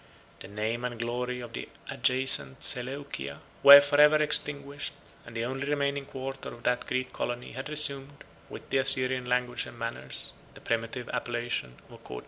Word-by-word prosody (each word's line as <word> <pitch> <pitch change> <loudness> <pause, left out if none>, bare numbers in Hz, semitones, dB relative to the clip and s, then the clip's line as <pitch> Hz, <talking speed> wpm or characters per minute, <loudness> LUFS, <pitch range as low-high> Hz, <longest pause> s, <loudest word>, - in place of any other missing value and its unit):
The - - -9
name 110 +4 -3
and 125 -1 -3
glory 125 +1 -2
of 120 -1 -9
the - - -6 0.2
adjacent 125 - 0
Seleucia 125 - -3 0.2
were 140 0 +12
forever 145 +1 +5
extinguished; 145 -1 0 0.3
and 115 - -11
the 115 - -1
only 135 +3 -3
remaining 140 -1 0
quarter 135 0 -6
of 120 - -12
that 125 0 0
Greek 130 0 -2
colony 120 0 -3
had 130 +4 -6
resumed, 140 -2 0 0.3
with - - -9
the 135 - +3
Assyrian 130 -2 +1
language 125 0 0
and - - -11
manners, 115 - -6 0.2
the - - -13
primitive 115 +1 -2
appellation 120 - -3 0.2
of - - -14
Coche. - - -7
125 Hz, 160 wpm, -29 LUFS, 120-140 Hz, 0.3 s, were